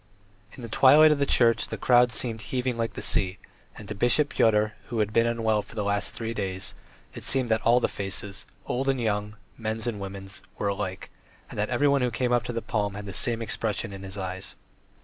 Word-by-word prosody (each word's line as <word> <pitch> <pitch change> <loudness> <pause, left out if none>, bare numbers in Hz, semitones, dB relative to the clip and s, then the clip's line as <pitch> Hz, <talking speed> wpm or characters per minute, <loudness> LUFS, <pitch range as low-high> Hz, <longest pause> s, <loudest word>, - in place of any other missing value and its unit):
In 125 - -11
the - - -5
twilight 145 +7 +7
of 150 - +1
the 140 - +1
church 115 -2 +3
the - - -5
crowd 125 -1 +4
seemed 110 -1 -2
heaving 125 +3 -2
like 115 -1 -2
the - - -6
sea, 95 0 +1 0.4
and 105 - -10
to 105 - -4
Bishop 120 +8 +3
Pyotr, 110 -3 +2
who 120 - -4
had 105 -1 0
been 115 +1 +4
unwell 110 -2 +1
for - - -15
the 105 - -1
last 100 0 -1
three 115 0 -4
days, 95 -3 -3 0.4
it - - -8
seemed 130 -3 +2
that 110 0 +2
all 120 +2 +4
the - - +1
faces 100 0 -4 0.2
old 135 +2 -1
and 135 -1 +1
young, 105 -2 -1 0.2
men's 110 0 -2
and 115 -4 -2
women's 95 0 -6 0.2
were 100 - 0
alike, 95 -2 -4 0.4
that - - -2
everyone 140 -1 +3
who 125 - +2
came 125 +2 -1
up 120 0 +1
for 120 - -3
the 115 - -3
palm 105 -3 -1
had 105 0 -6
the 100 - -6
same 115 +2 0
expression 110 -1 -2
in 95 - -8
his 95 +1 -6
eyes. 95 0 -5
110 Hz, 220 wpm, -26 LUFS, 100-120 Hz, 0.4 s, twilight